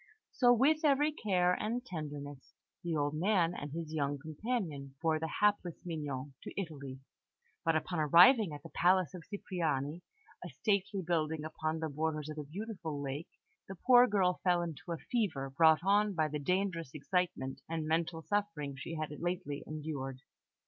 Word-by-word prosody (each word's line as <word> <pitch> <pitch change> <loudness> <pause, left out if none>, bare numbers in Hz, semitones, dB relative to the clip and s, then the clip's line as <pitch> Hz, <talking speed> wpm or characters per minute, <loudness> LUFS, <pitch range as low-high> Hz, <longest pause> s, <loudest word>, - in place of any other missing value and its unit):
So 245 -2 +4
with 290 +7 +4
every 295 +1 +4
care 185 -9 +2
and 235 +6 -2
tenderness 145 - -7 0.3
the 170 -2 -1
old 145 -1 0
man 175 +1 +2
and 145 -4 -6
his 160 0 -5
young 145 -2 0
companion 155 - -4
bore 160 -1 +1
the 160 - -2
hapless 205 -5 +2
Mignon 145 -5 -4
to - - -6
Italy; 140 -7 -6 0.6
but 165 -1 +2
upon 160 +2 -1
arriving 175 - +7
at 145 -1 -8
the 165 - -9
palace 180 -1 +3
of 180 - -7
Cipriani 165 -6 -2 0.4
a - - -6
stately 200 -2 0
building 160 -2 0
upon 155 0 -2
the 160 0 -2
borders 155 0 -2
of 155 0 -5
a - - -3
beautiful 170 -2 -5
lake 140 +3 -4 0.4
the 195 - -7
poor 245 +5 +6
girl 190 -4 +1
fell 175 -2 +3
into 170 +1 -6
a 165 - -1
fever, 160 - -2
brought 160 +2 +5
on 205 +1 +3
by 155 -2 +2
the 150 0 -3
dangerous 170 -2 -1
excitement 150 -3 -1
and 160 -1 -2
mental 160 +1 0
suffering 205 -9 -1
she 135 +5 -6
had 155 -1 -3
lately 175 -5 -3
endured. 145 -4 -5
165 Hz, 165 wpm, -33 LUFS, 150-190 Hz, 0.6 s, arriving